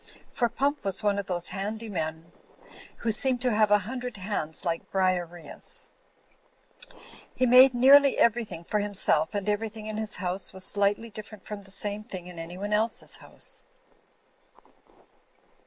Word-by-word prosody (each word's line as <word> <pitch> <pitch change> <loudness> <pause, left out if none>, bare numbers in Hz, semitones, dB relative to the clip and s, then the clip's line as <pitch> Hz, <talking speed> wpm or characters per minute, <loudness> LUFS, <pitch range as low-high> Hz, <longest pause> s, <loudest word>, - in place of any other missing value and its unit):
For 240 -2 0
Pump 280 +5 -1
was 195 0 0
one 200 -1 +2
of 200 - -5
those 175 -1 -1
handy 210 +4 -4
men 160 -4 -4 0.7
who 230 - -1
seem 255 +4 +5
to 250 0 0
have 215 0 +3
a 210 - +6
hundred 250 -1 -5
hands 185 -4 -3
like 165 -1 -2
Briareus; 180 -3 -1 1.4
he 255 - +2
made 255 +1 +7
nearly 275 +3 +6
everything 220 -7 +1
for 210 +5 -1
himself 200 -5 +2
and 200 0 -2
everything 215 +1 -2
in 215 0 -5
his 215 -1 -2
house 185 +1 -3
was 190 0 -1
slightly 205 +3 0
different 215 0 -10
from 210 -1 -6
the 195 - -14
same 205 +2 -2
thing 185 -5 -7
in 180 -2 -9
anyone 180 +5 -5
else's 220 +2 -1
house. - - -8
205 Hz, 150 wpm, -27 LUFS, 185-225 Hz, 1.4 s, made